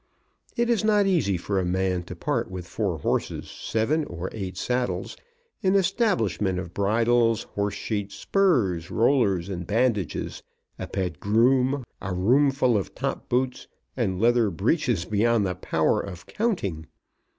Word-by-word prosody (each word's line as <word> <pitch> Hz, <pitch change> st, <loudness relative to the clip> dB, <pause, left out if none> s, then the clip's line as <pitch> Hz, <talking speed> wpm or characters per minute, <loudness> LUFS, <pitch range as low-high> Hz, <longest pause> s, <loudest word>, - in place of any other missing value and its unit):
It 235 Hz, 0 st, +2 dB
is 235 Hz, -2 st, +1 dB
not 210 Hz, -2 st, +4 dB
easy 160 Hz, -, +2 dB
for 95 Hz, +3 st, -1 dB
a -, -, 0 dB
man 90 Hz, 0 st, 0 dB
to -, -, -8 dB
part -, -, -1 dB
with 90 Hz, -2 st, -6 dB
four 95 Hz, -1 st, -2 dB
horses, 70 Hz, -, -2 dB
seven 135 Hz, +9 st, 0 dB
or 85 Hz, +2 st, -6 dB
eight 95 Hz, -4 st, -5 dB
saddles, 125 Hz, +4 st, -2 dB, 0.5 s
an 190 Hz, 0 st, +2 dB
establishment 115 Hz, -, +1 dB
of 90 Hz, -2 st, -5 dB
bridles, 115 Hz, +3 st, +2 dB
horsesheets, 100 Hz, 0 st, -2 dB
spurs, 115 Hz, -, +1 dB
rollers, 110 Hz, -8 st, +2 dB
and 90 Hz, -3 st, -5 dB
bandages, 110 Hz, -, 0 dB, 0.4 s
a -, -, -4 dB
pet 90 Hz, -6 st, -3 dB
groom, 125 Hz, +5 st, +3 dB, 0.2 s
a 95 Hz, -1 st, -3 dB
roomful 130 Hz, +5 st, +3 dB
of 95 Hz, -, -4 dB
top -, -, -3 dB
boots, 125 Hz, +1 st, -1 dB, 0.3 s
and 95 Hz, -7 st, -1 dB
leather 120 Hz, 0 st, +3 dB
breeches 105 Hz, -, 0 dB
beyond 110 Hz, 0 st, +2 dB
the 90 Hz, -, -1 dB
power 90 Hz, -, +1 dB
of 90 Hz, -3 st, -8 dB
counting. 100 Hz, -, -2 dB
105 Hz, 140 wpm, -25 LUFS, 95-130 Hz, 0.5 s, not